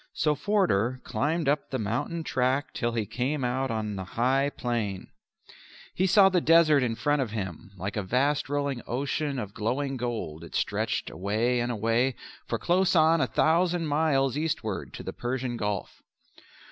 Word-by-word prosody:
So 150 - +2
Forder 145 - +1
climbed 160 +1 -1
up 145 +1 +1
the 130 - -2
mountain 120 +9 -2
track 130 0 0
till 120 -1 -1
he 115 -2 -1
came 130 +6 -2
out 130 +2 0
on 110 -2 -2
the 95 - -4
high 130 +8 +1
plain. 110 -6 -3 0.8
He 190 - +1
saw 195 +1 +7
the 185 -2 +2
desert 160 -3 +5
in 120 -3 0
front 145 +6 +1
of 125 - -2
him 95 -5 -5
like 95 +3 -4
a 105 - 0
vast 135 +9 0
rolling 140 -3 -1
ocean 140 +3 -2
of 105 -5 -5
glowing 135 +5 -2
gold 115 -10 -4
it 85 - -9
stretched - - -1
away 110 +6 0
and 120 +1 -1
away 115 +3 +1 0.3
for - - -1
close 180 +1 +2
on 160 0 +5
a - - +2
thousand 170 +1 +2
miles 145 -3 +1
eastward 110 - -2
to - - -7
the - - -5
Persian 125 0 -3
Gulf. 105 -3 -3
130 Hz, 170 wpm, -27 LUFS, 115-150 Hz, 0.8 s, saw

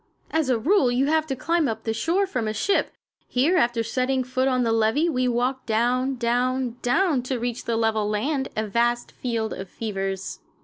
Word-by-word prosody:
As 315 -4 +1
a 250 - +3
rule 275 - +3
you 250 +3 +2
have 315 +1 +1
to 270 - -2
climb 330 +3 +1
up 225 - -3
to - - -35
the 225 - 0
shore 335 - +1
from 250 - -2
a 215 - -2
ship. 395 - +1 0.3
Here, 280 +9 +2
after 235 -6 +2
setting 255 +3 0
foot 255 +1 0
on 255 -2 +2
the 230 - +1
levee, 225 +8 +2
we 255 -4 +1
walked 250 +2 -1
down, 250 +4 +1
down, 245 +1 0
down 280 +2 +2
to 250 +1 -3
reach 240 0 -3
the 230 -1 0
level 220 -2 +1
land 265 +6 -1
a 215 - 0
vast 240 +3 0
field 230 -3 -3
of 190 -1 -7
fevers. 195 -3 -4
245 Hz, 205 wpm, -24 LUFS, 225-270 Hz, 0.3 s, a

